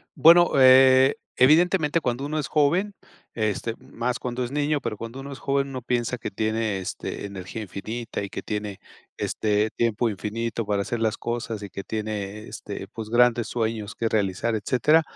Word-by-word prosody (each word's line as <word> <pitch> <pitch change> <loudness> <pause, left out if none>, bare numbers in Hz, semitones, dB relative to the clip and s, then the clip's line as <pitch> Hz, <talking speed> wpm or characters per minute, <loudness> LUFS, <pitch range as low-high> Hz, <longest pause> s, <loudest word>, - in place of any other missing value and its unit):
Bueno, 175 +2 +7
eh, 130 0 +7 0.2
evidentemente 160 +3 +4
cuando 125 -3 -2
uno 155 +1 -3
es 150 - -1
joven, 165 +8 +2 0.4
este, 110 +1 -1
más 120 +1 -3
cuando 125 0 -3
es 120 - -5
niño, 145 +1 0
pero 115 -5 -4
cuando 115 +4 -8
uno 140 +1 -8
es 135 - -8
joven, 140 0 0
uno 130 -2 -5
piensa 120 0 -1
que - - -4
tiene, 110 0 -1
este, 95 +2 -5
energía 100 +2 -6
infinita 110 +4 -5
y 100 - -5
que - - -6
tiene, 105 -2 -4 0.4
este, 105 0 0
tiempo 115 0 +1
infinito 110 +2 -3
para 100 -1 0
hacer 120 +3 -3
las 110 -1 0
cosas 115 -3 -4
y 100 - -8
que 100 - -6
tiene, 105 -1 -4
este, 100 -1 -7
pues, 110 -1 -6
grandes 120 0 +3
sueños 110 -2 -3
que 115 - -1
realizar, 105 +1 0
etcétera. 125 +9 +3
115 Hz, 175 wpm, -25 LUFS, 105-130 Hz, 0.4 s, Bueno